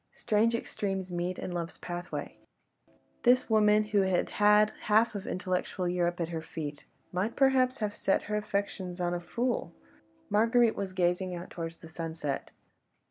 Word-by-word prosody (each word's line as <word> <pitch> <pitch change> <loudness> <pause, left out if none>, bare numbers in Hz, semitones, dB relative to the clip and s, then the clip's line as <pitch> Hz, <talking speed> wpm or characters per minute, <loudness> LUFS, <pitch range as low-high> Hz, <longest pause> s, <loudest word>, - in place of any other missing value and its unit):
Strange 230 +1 +2
extremes 195 -5 -3
meet 175 +1 -2
in - - -5
love's 170 -1 -4
pathway: 175 0 -6 0.8
this 250 -1 +4
woman, 210 -1 +5
who 210 -1 +2
had 190 -2 +1
had 210 +1 +5
half 220 +1 +4
intellectual 185 0 -2
Europe 175 0 0
at 170 -1 -1
her 165 -2 -3
feet, 150 -2 -6 0.3
might 190 +5 -1
perhaps 265 -1 +3
have 210 -2 -2
set 195 - +1
her 210 - -3
affections 200 -3 -2
on 175 0 0
a 175 - -1
fool. 230 -1 -2 0.5
Marguerite 230 +2 +4
was 195 -2 -4
gazing 180 0 +1
out 175 +1 -8
towards 165 -1 -5
the 165 - -12
sunset. 160 -3 -4
190 Hz, 150 wpm, -30 LUFS, 175-215 Hz, 0.8 s, woman